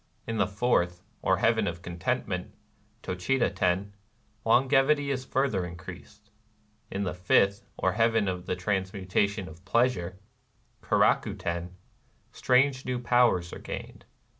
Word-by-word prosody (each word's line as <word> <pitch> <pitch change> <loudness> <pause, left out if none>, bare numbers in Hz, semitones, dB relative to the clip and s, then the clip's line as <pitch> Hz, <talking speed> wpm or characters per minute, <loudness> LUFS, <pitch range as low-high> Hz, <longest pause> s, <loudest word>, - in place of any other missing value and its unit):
In 115 0 -3
the 100 - +3
fourth, 95 -5 0 0.2
or 95 - +2
Heaven 110 +1 +2
of 85 0 -4
Contentment 90 +1 -3 0.5
(^TocJiita 120 +8 0
Ten)^ 95 +3 0 0.5
longevity 135 +4 +3
is 130 -1 -3
further 130 -10 0
increased. 85 -1 -10 0.6
In 100 - -2
the 90 -2 -2
fifth, 95 +2 +2
or - - +1
Heaven 115 -1 +2
of 90 -1 -3
the - - 0
Transmutation 95 +1 -1
of 80 +3 -13
Pleasure 100 -5 +1 0.6
(Keraku - - +2
Ten)^ 85 +1 -4 0.6
strange 130 +1 +2
new 125 -1 -2
powers 120 -8 +2
are - - -7
gained. - - -8
100 Hz, 125 wpm, -28 LUFS, 90-120 Hz, 0.6 s, the